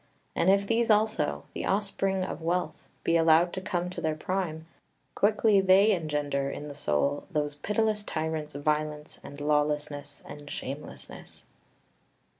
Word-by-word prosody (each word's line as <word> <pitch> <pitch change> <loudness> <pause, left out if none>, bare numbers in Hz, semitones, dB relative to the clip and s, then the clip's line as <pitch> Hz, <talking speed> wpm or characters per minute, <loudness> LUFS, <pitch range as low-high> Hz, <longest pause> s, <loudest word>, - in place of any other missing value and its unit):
And 180 - +3
if 200 +1 +4
these 230 +2 +1
also, 210 - +2
the - - -4
offspring 195 -1 +1
of 175 - -5
Wealth, 175 +2 -2
be 165 - +3
allowed 165 +1 +5
to 185 - -4
come 180 -2 -2
to - - -6
their 155 -1 0
prime, 160 -2 -3 0.5
quickly 210 -1 +4
they 190 +3 +6
engender 150 -6 -1
in 150 +1 -6
the - - -6
soul 140 - 0
those 150 -4 -1
pitiless 210 +7 0
tyrants, 155 -5 -3
Violence, 150 +1 -2
and 145 - -9
Lawlessness, 145 -1 -1
and 145 0 -10
Shamelessness. 140 +2 -8
160 Hz, 140 wpm, -28 LUFS, 145-195 Hz, 0.5 s, they